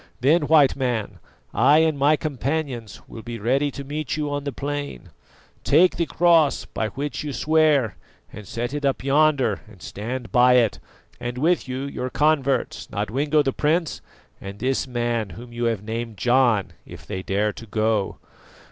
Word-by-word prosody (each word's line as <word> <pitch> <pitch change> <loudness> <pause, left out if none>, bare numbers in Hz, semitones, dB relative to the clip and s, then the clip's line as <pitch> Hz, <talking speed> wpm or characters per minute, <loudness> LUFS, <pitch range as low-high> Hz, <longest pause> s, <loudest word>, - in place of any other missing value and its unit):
Then 150 +4 +3
White 150 -4 +5
Man, 120 -6 -2 0.3
I 150 - +5
and 160 -2 +1
my 145 +2 +3
companions 140 -6 -3
will 115 - -9
be 120 +1 -6
ready 130 +7 +1
to 140 0 -7
meet 150 +1 -4
you 150 -1 -2
on 145 0 -3
the 140 - -2
plain. 145 - -5 0.5
Take 180 +2 +4
the 170 -1 0
cross 165 -4 +3
by 110 - -3
which 140 +9 -4
you 150 - -4
swear 150 - +2 0.4
and 105 -2 -10
set 120 +3 -4
it 145 0 -4
up 135 -2 0
yonder 140 -5 +2
and 105 -3 -16
stand 115 +7 -6
by 125 -1 +5
it, 120 -4 +3 0.4
and 120 0 -5
with 165 +5 +1
you 130 +1 -4
your 130 -2 -4
converts, 140 -3 0
Nodwengo 140 +9 0
the 135 -2 -1
prince, 160 +2 0 0.4
and 100 +1 -8
this 130 +4 -1
man 120 -3 -1
whom 120 0 -11
you 120 0 -2
have 115 -4 -1
named 115 0 -5
John, 120 -5 +2
if - - -12
they 95 - -5
dare 105 +2 0
to 115 - -11
go. 110 -1 0
130 Hz, 170 wpm, -23 LUFS, 115-145 Hz, 0.5 s, White